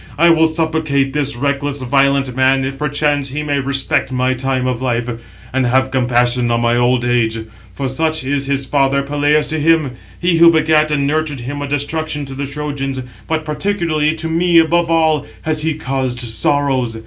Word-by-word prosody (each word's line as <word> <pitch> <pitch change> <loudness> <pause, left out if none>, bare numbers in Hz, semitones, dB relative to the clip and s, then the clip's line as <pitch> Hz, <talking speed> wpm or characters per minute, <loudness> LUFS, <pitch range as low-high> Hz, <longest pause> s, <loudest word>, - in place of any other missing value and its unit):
I 170 +2 +5
will 160 0 +4
supplicate 155 -4 0
this 145 -2 -1
reckless, 140 +1 -2
violent 135 0 +1
man, 130 0 +2
if 135 0 -5
perchance 145 -1 0
he 150 +3 -4
may 145 -1 -1
respect 135 -1 0
my 130 0 +1
time 130 0 -1
of 125 -1 -2
life, 120 -2 -1 0.5
and 130 -1 +1
have 130 +2 +1
compassion 125 -1 +1
on 115 0 +1
my 120 0 +2
old 120 0 +2
age; 120 -2 +1 0.4
for 135 - -3
such 155 +4 -1
is 140 +1 -1
his 140 -1 -1
father 140 0 +1
Peleus 145 +1 +1
to 155 - -2
him, 155 -3 +2 0.3
he 175 -1 +1
who 170 0 +8
begat 155 -1 +3
and 145 -2 0
nurtured 150 -2 -1
him 145 +4 -5
a 145 - -3
destruction 145 +1 -2
to 135 - -8
the 140 +1 -4
Trojans; 140 -2 -4 0.3
but 160 -1 -2
particularly 155 -2 -1
to 160 0 -3
me 170 +1 +2
above 165 +1 +3
all 160 -2 +2 0.2
has 155 -1 -1
he 160 0 -1
caused 130 -4 -3
sorrows. 125 0 0
140 Hz, 185 wpm, -16 LUFS, 130-155 Hz, 0.5 s, who